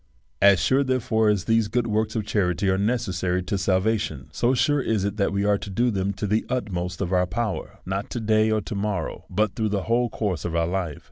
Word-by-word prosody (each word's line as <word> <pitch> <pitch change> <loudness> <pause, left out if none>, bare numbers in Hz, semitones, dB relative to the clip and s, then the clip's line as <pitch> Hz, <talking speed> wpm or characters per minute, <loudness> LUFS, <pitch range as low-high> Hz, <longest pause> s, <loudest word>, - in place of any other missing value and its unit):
As 100 -1 +6
sure, 135 +2 +3
therefore, 115 -4 +1
as 100 -4 +1
these 115 -2 +2
works 110 -2 0
of 110 -2 -1
charity 100 -2 0
are 95 - +1
necessary 95 -5 0
to 90 +3 -2
salvation, 95 -6 0
so 120 +9 +1
sure 145 +2 +2
is 110 -6 0
it 100 +1 -2
that 100 - +1
we 100 +1 0
are 105 -1 +2
to - - -7
do 120 +6 +1
them 100 -1 -1
to 105 - -4
the 105 +2 +1
utmost 90 -8 -3
of 95 -1 -1
our 90 0 +3
power; 105 +2 -3
not 95 +2 -3
to 120 - -4
day 110 0 +2
or 110 0 +1
to 110 - -6
morrow, 100 -4 -3
but 105 +2 0
through 110 -1 0
the 100 -2 -1
whole 120 +1 +1
course 100 -8 -2
of 85 -1 -3
our 85 0 +2
life. 85 -3 -2
105 Hz, 225 wpm, -24 LUFS, 95-110 Hz, -, As